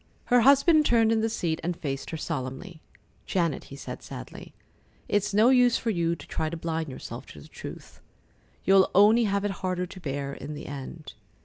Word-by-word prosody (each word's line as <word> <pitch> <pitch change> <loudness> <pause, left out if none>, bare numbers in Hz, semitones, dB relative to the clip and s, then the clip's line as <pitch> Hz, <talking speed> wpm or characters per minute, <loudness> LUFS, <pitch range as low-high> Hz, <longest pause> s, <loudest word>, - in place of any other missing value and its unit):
Her 245 - +7
husband 280 +5 +6
turned 230 -5 +3
in 225 -1 +2
the 225 - +1
seat 165 -7 -2
and 175 0 -2
faced 135 -2 -4
her 160 - -4
solemnly. 155 +3 -5 0.5
"Janet," 170 -5 0
he 140 - -10
said 140 - -8
sadly, - - -10 0.5
"it's 205 0 +1
no 215 +4 +5
use 250 -2 +5
for 230 - -1
you 170 -3 0
to 145 - -12
try 155 - -2
to 170 - -5
blind 160 -1 -3
yourself 130 -1 -8
to 75 - -12
the 70 - -13
truth. - - -10 0.6
You'll 195 0 +5
only 215 +4 +6
have 200 0 0
it 205 - 0
harder 185 -1 -1
to 185 - -11
bear 140 -3 -4
in 150 +1 -7
the - - -8
end. 140 +2 -8
175 Hz, 195 wpm, -27 LUFS, 150-220 Hz, 0.6 s, Her